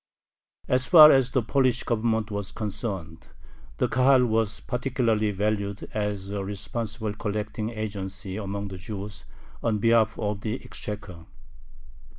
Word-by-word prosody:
As 130 0 +1
far 155 -4 +10
as 135 -2 +4
the 125 -1 +1
Polish 130 0 +2
Government 110 -2 0
was 100 -1 -4
concerned, 95 -6 -5 0.5
the - - +2
Kahal 130 0 +4
was 110 -2 0
particularly 120 -4 0
valued 100 0 -2
as 105 -2 -2
a 100 -1 -2
responsible 105 +2 -4
collecting 105 +1 -3
agency 100 -4 -5
among 100 -1 -4
the 95 - -7
Jews 100 +2 -7 0.4
on 110 -2 +1
behalf 115 0 +3
of 105 -1 -2
the 110 +1 -2
exchequer. 105 -6 -7
105 Hz, 130 wpm, -26 LUFS, 100-115 Hz, 0.5 s, far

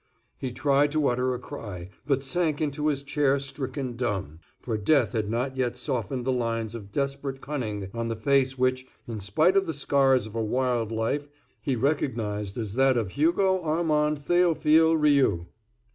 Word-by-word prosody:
He 130 - -3
tried 140 +3 +2
to 155 -2 +2
utter 125 +1 0
a - - -6
cry, 95 -7 -8 0.2
but 135 -2 +1
sank 155 +1 0
into 150 0 -1
his 140 -2 0
chair 140 -1 +2
stricken 135 -2 -5
dumb; 100 - -3 0.2
for 115 - -3
death 135 +8 +2
had 110 -4 -2
not 125 +4 -1
yet 125 -2 -1
softened 125 -1 -3
the 130 - +1
lines 115 -3 -1
of 105 -4 -8
desperate 140 +1 -2
cunning 110 -10 -4
on 115 0 -2
the 115 - -2
face, 135 +2 +1
which, 130 0 0 0.2
in 115 -2 -5
spite 155 - +2
of 195 -1 +3
the 160 - -2
scars 135 -4 +3
of 110 - -10
a 115 - -1
wild 120 -1 0
life, 115 +6 -1 0.3
he 135 - 0
recognized 110 -7 -1
as 110 -4 -3
that 130 +1 +3
of 110 -5 -1
Hugo 185 - +2
Armand 150 -2 +1
Theophile 160 -2 +4
Rioux. 140 - +3
130 Hz, 175 wpm, -26 LUFS, 115-145 Hz, 0.3 s, Theophile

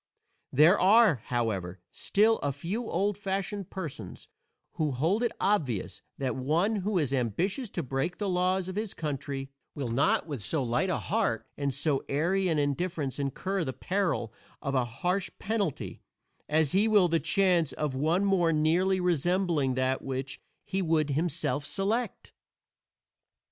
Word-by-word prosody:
There 155 +9 +6
are, 205 - +6
however, 100 -7 -2
still 220 +2 +2
a 145 - -1
few 185 - -4
old 205 0 0
fashioned 195 -1 -3
persons 145 - -7 0.4
who 150 -3 -1
hold 165 - +1
it 240 - +1
obvious 145 - 0 0.2
that 130 -3 -2
one 165 +12 +1
who 200 0 -1
is 145 -5 0
ambitious 175 - -1
to 170 - -3
break 135 +6 -2
the 205 - -2
laws 185 0 +1
of 185 - -5
his 210 -1 -3
country 140 -3 -4 0.2
will 135 -5 -3
not 130 +5 +2
with 145 -8 -5
so 140 +5 0
light 125 +11 0
a 180 - +1
heart 200 - -1
and 140 -1 -1
so 140 +1 0
airy 180 +7 +1
an 160 - +1
indifference 145 -1 -1
incur 180 +7 -1
the 130 -4 -3
peril 165 - -1 0.3
of 140 - -3
a 130 -2 +2
harsh 180 - -1
penalty 175 - -2 0.5
as 155 -1 +2
he 200 +4 +3
will 205 -4 +5
the 165 -1 +2
chance 175 -2 +2
of 150 -1 -2
one 160 +8 +1
more 180 -4 +3
nearly 170 +5 +2
resembling 175 -5 +1
that 130 0 0
which 135 +1 -4 0.2
he 195 -1 -1
would 160 -4 +1
himself 155 -1 -1
select. 215 +10 -2
165 Hz, 155 wpm, -29 LUFS, 135-195 Hz, 0.5 s, There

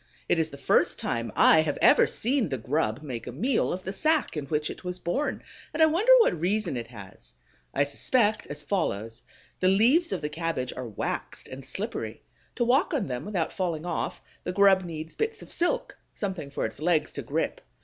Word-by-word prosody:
It 170 - +2
is 160 -1 +1
the 140 - -10
first - - +2
time 115 -1 -2
I 160 - +7
have 150 -2 -2
ever - - +6
seen 245 - 0
the 135 - -2
grub 125 +1 -1
make 125 -6 -6
a - - -4
meal 225 - 0
of 185 +1 -4
the 190 - -4
sack 310 - +2
in 145 -3 -4
which 150 0 -1
it - - -11
was 180 0 -4
born, 220 +12 -2 0.3
and 320 - +4
I - - +9
wonder 350 +10 +3
what 175 - +2
reason 190 -3 0
it 120 -2 -4
has. 95 - -12 0.4
I - - +2
suspect 215 - +1
as - - -7
follows: 115 - -2 0.4
the 185 - +2
leaves 245 - +4
of - - -2
the 150 - -1
cabbage 160 -5 -3
are 125 -1 -6
waxed 105 - -4
and 130 +1 -9
slippery. 190 - -5 0.3
To 240 - +1
walk 280 +8 +3
on 255 - 0
them 125 -3 -4
without 190 -6 -2
falling 175 -4 -2
off, 175 -2 -3 0.2
the 180 - -2
grub 195 0 +5
needs 160 -1 -7
bits 445 0 -2
of - - -14
silk, - - 0 0.2
something 185 -8 -4
for 140 - -2
its 110 - -6
legs 160 0 +1
to - - -5
grip. - - -2
170 Hz, 205 wpm, -27 LUFS, 140-215 Hz, 0.4 s, I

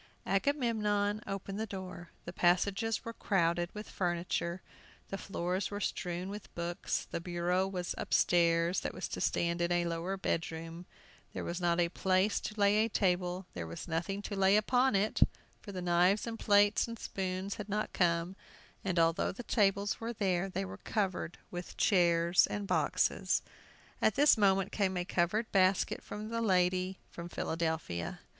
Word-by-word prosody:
Agamemnon 210 -3 +1
opened 195 +1 -4
the 220 - -2
door. 185 -3 -7 0.2
The 175 - -6
passages 195 +6 +1
were 230 - -5
crowded 175 -4 +1
with 210 +1 -6
furniture, 175 0 -2 0.5
the 195 - -3
floors 185 0 -2
were 205 - -4
strewn 180 -2 -3
with 205 -1 -8
books; 170 0 -2
the - - -3
bureau 180 +2 0
was 180 -2 -3
upstairs 170 0 +3
that - - -5
was - - -3
to - - -4
stand 170 0 0
in 170 0 +1
a 175 0 +2
lower 170 +3 -2
bedroom; 165 -1 -3 0.5
there - - -4
was 175 +1 -4
not 170 0 +2
a 170 - +4
place 185 +3 +1
to 215 0 -6
lay 205 +1 +4
a 225 - -1
table, 180 -2 0
there 85 -2 -5
was 85 - -7
nothing 175 +5 -2
to 205 - -4
lay 195 +1 +5
upon 245 +3 +3
it; 200 +2 +1 0.4
for 205 - -8
the 185 -2 -5
knives 180 +4 +3
and 225 -1 -5
plates 205 +1 +4
and 230 0 -6
spoons 190 -1 -3
had 210 -1 -6
not 210 +2 -2
come, 170 +1 +1 0.5
and 185 -2 -1
although 165 0 +3
the 245 - -8
tables 200 -3 +1
were 230 +1 -3
there 190 -3 0
they 100 - -2
were 95 +1 -8
covered 190 - -2
with 175 0 -7
chairs 170 -2 +4
and 205 -1 -3
boxes. - - +1 0.6
At 220 - +3
this 290 +1 +6
moment 195 -2 +3
came 190 -3 0
a 175 - -1
covered 190 +7 0
basket 190 -1 +2
from 215 +1 -6
the 230 0 -2
lady 185 -2 +2
from 170 0 -7
Philadelphia. 160 - -3
185 Hz, 165 wpm, -32 LUFS, 175-205 Hz, 0.6 s, this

